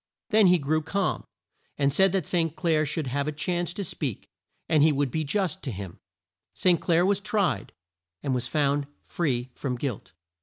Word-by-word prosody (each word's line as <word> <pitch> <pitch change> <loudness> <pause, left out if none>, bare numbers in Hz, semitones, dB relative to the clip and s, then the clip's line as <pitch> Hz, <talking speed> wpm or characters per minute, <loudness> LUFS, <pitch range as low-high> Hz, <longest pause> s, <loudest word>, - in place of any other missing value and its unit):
Then 215 -2 +6
he 180 0 +6
grew 155 +1 0
calm, 195 +5 -1 0.5
and 140 -1 +2
said 190 +4 +5
that 190 - 0
St. 165 -3 0
Clair 160 -4 +1
should 155 +1 -2
have 140 +3 -2
a - - 0
chance 175 +4 -2
to 200 - -3
speak, 145 - -4 0.4
and 155 -2 +3
he 155 +1 +6
would 140 -2 0
be 155 - -1
just 180 +2 -1
to 135 - -4
him. 95 -3 -7 0.6
St. 180 -2 +3
Clair 170 0 +3
was 200 0 +2
tried, 205 -1 -1 0.5
and 135 - 0
was 125 -1 -1
found 145 0 +1 0.2
free 130 -7 -2
from 130 -3 -3
guilt. 120 - -5
155 Hz, 185 wpm, -26 LUFS, 140-180 Hz, 0.6 s, Then